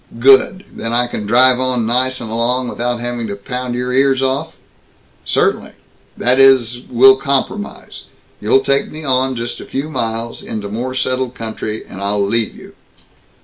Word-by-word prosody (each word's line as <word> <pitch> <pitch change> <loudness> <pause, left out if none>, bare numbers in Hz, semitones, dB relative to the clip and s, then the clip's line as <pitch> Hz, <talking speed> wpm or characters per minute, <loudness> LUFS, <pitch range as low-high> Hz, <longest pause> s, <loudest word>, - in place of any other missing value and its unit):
"Good. 135 +9 +4
Then 115 0 -4
I 120 +1 +3
can 105 -3 -5
drive 125 +3 +5
on 130 -3 0
nice 130 +3 +1
and 110 -2 -6
alone, 120 +2 0
without 120 0 -2
having 120 -1 -3
to 100 - -4
pound 125 +4 -5
your 125 +1 -2
ears 135 0 +2
off?" 135 +4 -2 0.7
"Certainly. - - 0 0.4
That 125 +2 +2
is 130 -3 +4
we'll 130 +2 +6
compromise. 140 +9 -3 0.3
You 110 +5 +3
take 140 +1 +1
me 155 +1 -8
on 130 -1 +1
just 120 0 -4
a - - -9
few 145 +4 -4
miles, 115 -3 -3
into 105 -2 -6
more 125 +5 -4
settled 130 0 -1
country, 110 -1 -5
and 95 - -10
I'll 100 0 0
leave 115 +2 -1
you." - - -13
125 Hz, 165 wpm, -17 LUFS, 115-130 Hz, 0.7 s, we'll